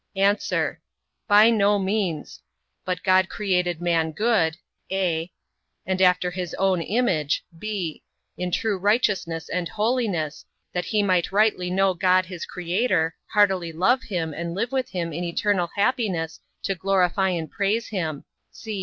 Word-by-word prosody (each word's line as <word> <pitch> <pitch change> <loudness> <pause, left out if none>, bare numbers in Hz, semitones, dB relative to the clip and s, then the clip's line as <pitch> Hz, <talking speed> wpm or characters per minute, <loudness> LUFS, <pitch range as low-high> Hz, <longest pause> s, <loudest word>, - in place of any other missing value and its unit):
A. 200 +1 +4 0.9
By 210 +2 +7
no 205 -2 +3
means; 190 -5 -2 0.4
but 180 -1 -3
God 185 0 +4
created 180 -4 0
man 165 -2 +1
good, 190 -6 +1 0.3
(a) 175 -3 -1 0.5
and 190 0 -1
after 180 -1 +3
his 180 -2 -4
own 190 -2 +1
image, 170 - 0 0.2
(b) 195 -7 -4 0.3
in 180 0 -3
true 200 +2 0
righteousness 195 -6 +1
and 180 -1 -2
holiness, 210 - -1 0.3
that 180 -1 -2
he 210 +2 +1
might 185 -3 +1
rightly 200 -3 +2
know 190 +1 +2
God 185 +1 +3
his 180 -2 -7
Creator, 180 -2 0
heartily 190 -5 +2
love 190 +11 +2
him 165 -9 -3
and 170 +2 -4
live 230 +6 -2
with 260 -2 -1
him 170 -3 -3
in 170 +4 -3
eternal 175 0 0
happiness 200 - 0 0.2
to 195 - 0
glorify 190 +1 +1
and 165 -3 -3
praise 215 +3 0
him. 160 -8 -3
185 Hz, 140 wpm, -24 LUFS, 170-205 Hz, 0.9 s, By